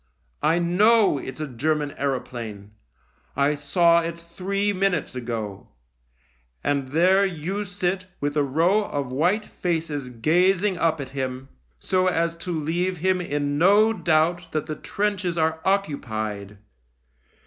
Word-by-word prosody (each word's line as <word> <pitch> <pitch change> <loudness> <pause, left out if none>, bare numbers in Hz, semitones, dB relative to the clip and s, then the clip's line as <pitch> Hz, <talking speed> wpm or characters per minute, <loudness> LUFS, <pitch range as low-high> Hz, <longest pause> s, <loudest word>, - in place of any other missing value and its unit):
I 160 +2 +3
know 195 +1 +4
it's 130 +2 -7
a 155 - -2
German 145 +3 -1
aeroplane 120 -7 -4 0.3
— - - -38
I 145 - +2
saw 170 +4 +3
it 165 0 -4
three 195 +4 -2
minutes 185 -4 0
ago 115 -5 -5 0.5
— - - -40
and 140 -2 0
there 185 +7 +4
you 190 +2 -2
sit 185 0 -2
with 145 +1 -2
a 150 - +3
row 170 +10 +2
of 140 -7 -4
white 180 +11 +1
faces 160 -6 -3
gazing 180 - +2
up 160 -1 +1
at 135 -2 -5
him, 130 -1 -4 0.3
so 185 0 +1
as 170 -2 +1
to 175 +1 -5
leave 175 +3 -1
him 185 +2 +1
in 145 -3 -2
no 205 +5 +5
doubt 165 -2 +1
that 155 -1 -1
the 155 - -4
trenches 195 -3 -2
are 160 0 +1
occupied. 110 - -2
160 Hz, 140 wpm, -24 LUFS, 140-185 Hz, 0.5 s, no